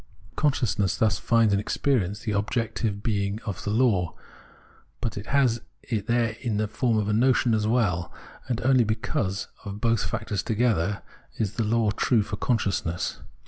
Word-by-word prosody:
Consciousness 120 Hz, -9 st, +1 dB
thus 110 Hz, -2 st, +2 dB
'finds 115 Hz, -3 st, +3 dB
in 100 Hz, -, +3 dB
experience 105 Hz, -3 st, 0 dB
the 110 Hz, -, -2 dB
objective 105 Hz, 0 st, -1 dB
being 100 Hz, -1 st, -1 dB
of 100 Hz, -5 st, -4 dB
the -, -, -2 dB
law, 105 Hz, -7 st, +2 dB, 0.8 s
but 115 Hz, -3 st, -2 dB
has 120 Hz, +2 st, +1 dB, 0.2 s
it 110 Hz, -4 st, -3 dB
there 115 Hz, -2 st, +1 dB
in 115 Hz, -5 st, -1 dB
the 105 Hz, 0 st, 0 dB
form 115 Hz, +1 st, 0 dB
of 105 Hz, -1 st, 0 dB
a 105 Hz, -, +1 dB
notion 125 Hz, +1 st, +3 dB
as 105 Hz, -1 st, +1 dB
well; 100 Hz, -7 st, +1 dB, 0.4 s
and 120 Hz, -1 st, -1 dB
only 130 Hz, 0 st, +4 dB
because 110 Hz, -3 st, -1 dB, 0.2 s
of 100 Hz, 0 st, -6 dB
both 115 Hz, 0 st, +2 dB
factors 100 Hz, -, -2 dB
together 105 Hz, -4 st, 0 dB, 0.3 s
is 105 Hz, -2 st, -1 dB
the 115 Hz, -, -1 dB
law 110 Hz, 0 st, +2 dB
true 110 Hz, +1 st, +2 dB
for 105 Hz, 0 st, -4 dB
consciousness. 100 Hz, -7 st, -1 dB
110 Hz, 160 wpm, -26 LUFS, 100-120 Hz, 0.8 s, only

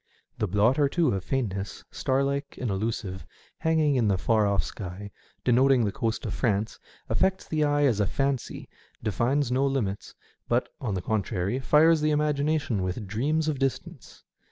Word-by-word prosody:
The 105 Hz, -, +1 dB
blot 105 Hz, +8 st, +2 dB
or 145 Hz, -1 st, +4 dB
two 165 Hz, -1 st, +2 dB
of 95 Hz, -2 st, -2 dB
faint 120 Hz, -5 st, -1 dB
ness, 100 Hz, -1 st, -6 dB
star 135 Hz, +1 st, 0 dB
like 140 Hz, +1 st, -3 dB
and 125 Hz, -4 st, -2 dB
illusive, 95 Hz, -2 st, -3 dB, 0.4 s
hanging 160 Hz, -2 st, +2 dB
in 120 Hz, -5 st, +2 dB
the 100 Hz, -2 st, +2 dB
far 110 Hz, +1 st, +2 dB
off 100 Hz, -4 st, +1 dB
sky, 100 Hz, +3 st, -7 dB, 0.3 s
denoting 125 Hz, 0 st, +4 dB
the 100 Hz, -, 0 dB
coast 115 Hz, +2 st, -2 dB
of 105 Hz, -, -3 dB
France, 110 Hz, -3 st, -1 dB, 0.3 s
affects 190 Hz, 0 st, 0 dB
the 155 Hz, -1 st, 0 dB
eye 145 Hz, 0 st, +2 dB
as 120 Hz, -7 st, +2 dB
a 100 Hz, -, +2 dB
fancy, 135 Hz, +4 st, -2 dB, 0.4 s
defines 120 Hz, +6 st, 0 dB
no 130 Hz, +2 st, +2 dB
limits, 110 Hz, -8 st, -2 dB, 0.3 s
but, 120 Hz, +1 st, +1 dB
on 110 Hz, -7 st, -2 dB
the 90 Hz, -, -3 dB
contrary, 105 Hz, +2 st, -1 dB
fires 155 Hz, +4 st, +4 dB
the 155 Hz, -, +2 dB
imagina 150 Hz, +1 st, +1 dB
tion 115 Hz, -9 st, -2 dB
with 95 Hz, +4 st, -3 dB
dreams 145 Hz, +11 st, 0 dB
of 150 Hz, -4 st, -1 dB
distance. 135 Hz, -1 st, -4 dB
125 Hz, 180 wpm, -27 LUFS, 100-140 Hz, 0.4 s, or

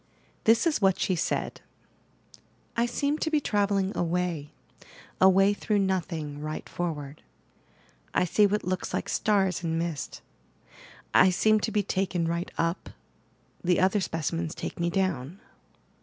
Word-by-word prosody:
This 225 Hz, +5 st, +5 dB
is 315 Hz, -8 st, +1 dB
what 190 Hz, -2 st, +3 dB
she 185 Hz, -, +1 dB
said: 170 Hz, -, -2 dB, 1.1 s
"I 235 Hz, +1 st, +2 dB
seem 285 Hz, +5 st, -1 dB
to 315 Hz, -, 0 dB
be 310 Hz, -1 st, +2 dB
travelling 200 Hz, -5 st, 0 dB
away, 170 Hz, -3 st, -1 dB, 0.7 s
away 195 Hz, +2 st, +6 dB
through 210 Hz, +1 st, -1 dB
nothing, 170 Hz, -6 st, -1 dB
right 155 Hz, 0 st, -5 dB
forward. 150 Hz, -4 st, -4 dB, 0.9 s
I -, -, +2 dB
see 205 Hz, +4 st, +4 dB
what 210 Hz, +1 st, -1 dB
looks 185 Hz, 0 st, -2 dB
like -, -, -2 dB
stars 195 Hz, -4 st, +1 dB
and 165 Hz, -1 st, -1 dB
mist. 165 Hz, -4 st, -4 dB, 0.9 s
I 190 Hz, -, +7 dB
seem 215 Hz, +4 st, +3 dB
to 220 Hz, -, -2 dB
be 210 Hz, -2 st, +1 dB
taken 180 Hz, -3 st, -1 dB
right 170 Hz, +1 st, -2 dB
up, 165 Hz, +2 st, -1 dB, 0.7 s
the 180 Hz, 0 st, +2 dB
other 190 Hz, +2 st, +3 dB
specimens 165 Hz, 0 st, -2 dB
take -, -, -6 dB
me 170 Hz, 0 st, +1 dB
down." 175 Hz, -3 st, -1 dB
185 Hz, 140 wpm, -27 LUFS, 165-205 Hz, 1.1 s, I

